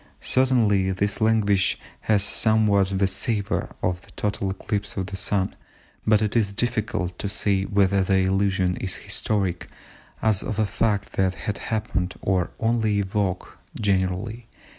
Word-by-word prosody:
Certainly 110 -8 +2
this 100 +3 -1
language 105 -3 +3 0.3
has 105 -2 +4
somewhat 100 -2 +3
the 100 - +3
savour 100 +2 -1
of 90 -1 -1
a - - -16
total 100 -1 -1
eclipse 100 +2 -4
of 95 - -1
the 100 +1 -6
Sun, 95 0 0 0.5
but 110 0 +4
it 105 +2 -1
is 105 -4 +2
difficult 105 -6 -1
to 100 - -2
say 100 -1 +1
whether 100 -1 +2
the 95 0 +2
allusion 95 -1 +1
is 95 - -3
historic, 95 -5 -1 0.5
as 110 -3 +2
of 110 - -4
a 110 - +2
fact 105 -1 -1
that 95 -1 +2
had 105 - -4
happened, 100 -5 -2
or 95 -2 0
only 110 -3 +1
a - - -2
vague 95 -2 -1 0.3
generality. 100 +3 -1
100 Hz, 150 wpm, -24 LUFS, 95-110 Hz, 0.5 s, has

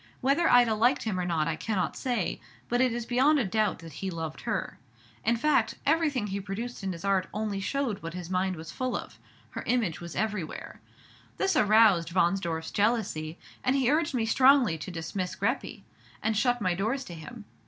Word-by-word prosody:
Whether 280 +6 +2
Ida 245 -2 +6
liked 240 +5 +2
him 210 -5 -2
or 180 - -1
not 165 -3 0
I 165 - 0
cannot 185 +2 -2
say; 245 -8 -2 0.3
but 245 +1 +2
it 255 -1 +3
is 235 0 -3
beyond 265 +6 +3
a 260 - +1
doubt 215 +1 +1
that 165 - -10
he 195 - -2
loved 160 -3 -5
her. - - -3 0.4
In 235 +1 +2
fact, 300 +5 +2
everything 295 -6 +2
he 200 -1 -3
produced 220 +6 -5
in 190 - -1
his 170 +1 -7
art 195 -2 +2
only 210 -2 -2
showed 230 0 -2
what 165 +1 -6
his 180 -2 -6
mind 185 +1 0
was 160 0 -8
full 255 -1 -2
of, - - -10 0.3
her - - -5
image 225 -11 0
was 170 -2 -7
everywhere. 210 -6 -3 0.6
This 390 0 +1
aroused 205 -6 +4
Wahnsdorf's 170 -2 +1
jealousy, 200 -7 0 0.3
and 255 - +2
he 265 -2 +3
urged 300 -2 +1
me 230 -3 +1
strongly 255 - +5
to 155 - -6
dismiss 180 +2 -4
Greppi, - - -2 0.4
and 220 0 +1
shut 245 +2 +2
my 185 -3 +1
doors 225 +9 -1
to 175 - -9
him. 190 +8 -10
210 Hz, 195 wpm, -28 LUFS, 180-245 Hz, 0.6 s, Ida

